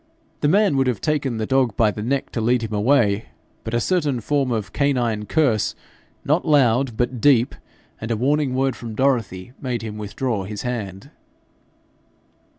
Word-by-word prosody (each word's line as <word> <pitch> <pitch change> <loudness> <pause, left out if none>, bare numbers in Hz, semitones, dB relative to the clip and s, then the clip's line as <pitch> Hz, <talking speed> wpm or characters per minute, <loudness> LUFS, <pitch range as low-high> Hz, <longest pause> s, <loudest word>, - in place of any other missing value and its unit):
The 145 - +1
man 195 -2 +3
would 135 -1 +2
have 125 -5 0
taken 145 -6 -1
the 110 - -2
dog 130 -3 +1
by 110 -2 +3
the 105 - -6
neck 135 +5 -2
to 115 - -2
lead 120 +1 +2
him 110 -1 -4
away, 105 -1 +2 0.4
but 110 - -3
a - - +2
certain 150 -3 0
form 135 +2 0
of 110 -3 -3
canine 120 -7 0
curse, 130 -10 +1 0.5
not 150 +5 +2
loud 130 -5 +2
but 120 -1 -1
deep, 130 -3 +4 0.5
and 115 - -5
a 115 - 0
warning 140 +2 +1
word 135 -1 +1
from 115 -1 -8
Dorothy, 120 -6 0
made 125 -4 -3
him 105 -1 -6
withdraw 105 0 -3
his 105 +1 -6
hand. 115 0 -5
125 Hz, 170 wpm, -22 LUFS, 110-140 Hz, 0.5 s, deep